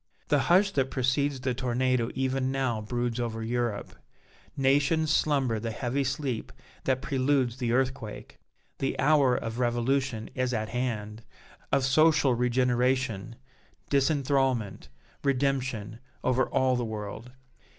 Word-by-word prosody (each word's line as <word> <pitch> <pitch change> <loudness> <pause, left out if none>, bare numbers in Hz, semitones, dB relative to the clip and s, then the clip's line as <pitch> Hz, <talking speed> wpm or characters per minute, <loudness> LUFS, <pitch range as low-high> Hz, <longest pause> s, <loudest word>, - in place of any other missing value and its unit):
The 145 - +4
hush 195 +4 +5
that 135 -6 0
precedes 135 +2 0
the 130 -1 0
tornado 125 -1 0
even 130 0 0
now 130 -5 -1
broods 120 +2 -2
over 115 -2 -3
Europe; 120 -2 -2 0.6
nations 145 +4 +2
slumber 135 -9 +1
the 115 +1 -3
heavy 125 +5 -1
sleep 135 -3 -3 0.3
that 130 0 0
preludes 135 -3 +1
the 120 -3 -1
earthquake. 130 -3 -2 0.4
The 135 - -1
hour 140 -3 +4
of 115 +1 -4
revolution 120 -1 0
is 130 -1 -1
at 110 0 -2
hand 115 -3 -3 0.5
of 135 - +2
social 145 0 +4
regeneration, 125 -2 0 0.6
disenthrallment, 135 -6 +1 0.4
redemption, 130 -5 -1 0.2
over 130 +1 +1
all 130 -1 +2
the 125 - -1
world. 110 +2 -6
130 Hz, 120 wpm, -28 LUFS, 120-135 Hz, 0.6 s, hush